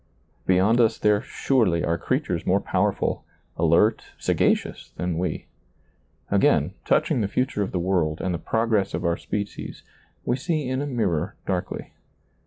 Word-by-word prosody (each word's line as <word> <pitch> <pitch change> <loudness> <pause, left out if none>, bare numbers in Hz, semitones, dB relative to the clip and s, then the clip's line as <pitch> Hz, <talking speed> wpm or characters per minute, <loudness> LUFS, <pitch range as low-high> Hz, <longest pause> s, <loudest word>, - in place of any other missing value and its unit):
Beyond 95 +6 +4
us 115 -1 +3
there 105 -1 +3
surely 105 -11 +1
are 85 - +1
creatures - - -1
more - - +2
powerful, - - 0 0.3
alert, 85 +7 +3
sagacious - - 0
than 90 -2 -2
we. 90 - -2 0.9
Again, - - +3
touch - - +2
ing 120 - +2
the 100 - +1
future 125 +1 -1
of 100 - -1
the - - -1
world 85 -4 0
and 95 -1 -1
the 85 - -2
progress 110 -4 0
of - - -3
our 85 0 +2
species, 105 +2 -5 0.4
we 120 - +1
see 155 -1 -1
in 130 +1 -1
a 145 - -2
mirror 100 - -1
darkly. 95 -1 -3
100 Hz, 155 wpm, -24 LUFS, 90-115 Hz, 0.9 s, Beyond